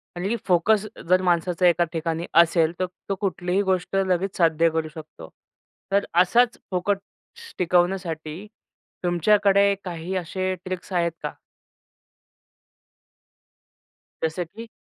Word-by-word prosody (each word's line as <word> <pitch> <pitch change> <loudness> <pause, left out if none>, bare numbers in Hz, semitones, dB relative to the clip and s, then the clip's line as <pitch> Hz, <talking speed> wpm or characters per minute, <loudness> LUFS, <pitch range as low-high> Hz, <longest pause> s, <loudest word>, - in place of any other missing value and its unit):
आणि 195 +6 -1
फोकस 195 +4 +3 0.2
जर 185 0 +5
माणसाचा 180 0 +2
एका 175 0 +4
ठिकाणी 165 0 -2 0.2
असेल 165 -1 +2
तर 185 - +1 0.2
तो 195 - 0
कुठलीही 185 0 0
गोष्ट 190 -1 -1
लगेच 190 0 0
साध्य 165 -1 +3
करू 160 0 -2
शकतो. 155 - -11 0.6
तर 200 +1 +2 0.2
असाच 240 +6 +3
फोकस 200 - -4
टिकवण्यासाठी 175 -1 0 0.6
तुमच्याकडे 200 +3 +3
काही 175 +1 -5
असे 185 +1 -2
ट्रिक्स 185 +1 -6
आहेत 170 -1 +1
का? - - -2 2.9
जसं 160 +3 -1
की? 225 +7 -11
180 Hz, 110 wpm, -24 LUFS, 170-195 Hz, 2.9 s, जर